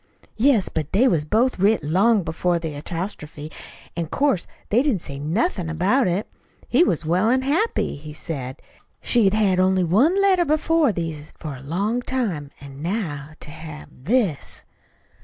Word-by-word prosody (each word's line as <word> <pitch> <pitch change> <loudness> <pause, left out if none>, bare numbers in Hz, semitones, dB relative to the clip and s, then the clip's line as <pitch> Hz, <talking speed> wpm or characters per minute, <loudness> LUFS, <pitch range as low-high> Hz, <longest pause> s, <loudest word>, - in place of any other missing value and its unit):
"Yes; 230 -4 +3
but 155 -2 -4
they 235 +7 +5
was 165 -10 +1
both 230 +7 +1
writ 205 -1 +3
long 195 +7 +3
before 170 +2 0
the 165 -2 -4
apostrophe, 155 -2 -6 0.4
an' 170 -1 -2
'course 270 - +1 0.2
they 230 +4 +4
didn't 265 - 0
say 140 -1 -6
nothin' 175 - -1
about 185 +11 +2
it. 180 +4 0 0.4
He 265 +8 +4
was 170 - 0
well 180 +7 +2
an' 260 +2 +2
happy, 320 - 0
he 150 +1 -9
said. 140 -4 -6 0.4
She 235 -4 +4
had 195 +1 +3
had 195 -4 +2
only 185 0 +3
one 255 - +3
letter 385 -3 +4
before 310 -2 +2
these 160 -5 -5
for 150 -3 -6
a 130 - -11
long 200 - -1
time. 210 - -2
An' 140 0 -11
now 155 -6 -3
to 150 - -9
have 155 -1 -9
this!" 185 - -1
185 Hz, 165 wpm, -22 LUFS, 155-240 Hz, 0.4 s, they